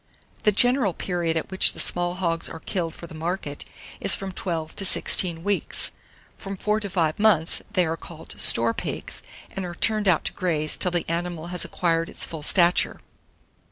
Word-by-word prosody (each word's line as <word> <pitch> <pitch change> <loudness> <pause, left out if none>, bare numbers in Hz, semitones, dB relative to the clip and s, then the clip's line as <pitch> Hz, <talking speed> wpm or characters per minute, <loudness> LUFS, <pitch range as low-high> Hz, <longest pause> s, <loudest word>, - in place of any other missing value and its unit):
The 210 - +5
general 245 -1 +2
period 170 -3 -2
at 160 - -5
which 190 - +4
the - - -10
small 175 0 0
hogs 170 -3 -1
are 160 - -9
killed 170 -2 -4
for - - -10
the 165 - -13
market 160 -2 -5 0.3
is - - +4
from 195 -1 -6
12 165 -4 -4
to - - 0
16 175 -3 +4
weeks; 205 0 0 0.5
from 195 -1 -7
4 210 +3 0
to 205 -2 -5
5 165 -3 -1
mouths, 200 -7 +3
they 185 -5 +2
are 160 0 -2
called 165 -1 -9
store 115 0 +7
pigs, - - -5 0.3
and 195 - -5
are 175 -1 -6
turned 215 +1 +2
out 175 -4 +3
to - - -2
graze 155 -5 -1
till 180 - +2
the 175 -1 -2
animal 170 0 -3
has 180 - -1
acquired 165 -1 -1
its - - -4
full 160 -2 -8
stature. 175 +3 +3
175 Hz, 190 wpm, -24 LUFS, 165-195 Hz, 0.5 s, store